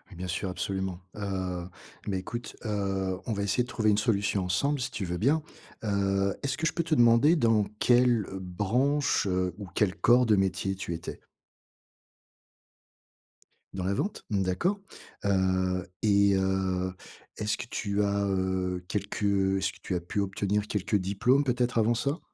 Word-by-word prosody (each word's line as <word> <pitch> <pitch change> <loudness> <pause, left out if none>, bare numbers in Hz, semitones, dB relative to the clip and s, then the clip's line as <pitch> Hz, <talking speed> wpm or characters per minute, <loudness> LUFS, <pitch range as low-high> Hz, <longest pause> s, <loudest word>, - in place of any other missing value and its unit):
Bien 90 +1 -5
sûr, 95 +2 -2
absolument. 95 -1 -3 0.2
Heu, 95 -3 -3 0.4
mais 95 -2 0
écoute, 120 +6 -6
heu, 95 -3 -1
on 115 - -1
va 100 - -2
essayer 100 +5 +1
de 125 - -9
trouver 110 -3 +1
une 100 - +3
solution 100 -3 +1
ensemble 140 +11 +1
si 125 +1 -3
tu 100 - -3
veux 90 0 -3
bien. 145 - +2 0.4
Heu, 100 -2 +1
est-ce 135 -2 0
que 160 - +1
je - - 0
peux 170 - 0
te 165 -1 -1
demander 120 +5 +5
dans 115 -7 +3
quelle, 120 -3 +4
heu, 95 - -5
branche, 115 +12 +1
heu, 90 -1 0
ou 100 -3 -7
quel 100 -2 +1
corps 120 +1 +4
de 105 - +5
métier 95 0 0
tu 95 -2 -4
étais? 85 - -7 2.5
Dans 95 - -4
la 100 - +1
vente? 200 - -3
Mmh, 100 -2 +1
d'accord. 175 - 0 0.5
Heu, 95 -2 +1 0.2
et 100 -2 +4
heu, 95 -1 0 0.4
est-ce 105 0 -1
que - - -5
tu 105 -3 -1
as, 100 0 +1
heu, 95 -1 -1
quelques, 105 +1 -3
heu, 95 -1 +2
est-ce 95 - -1
que - - -17
tu 90 - -3
as - - 0
pu 90 +4 -4
obtenir 100 +1 -1
quelques 105 0 -1
diplômes 100 +9 +2
peut-être 125 -2 +1
avant 115 +2 +3
ça? 140 +7 -1
100 Hz, 170 wpm, -28 LUFS, 95-115 Hz, 2.5 s, demander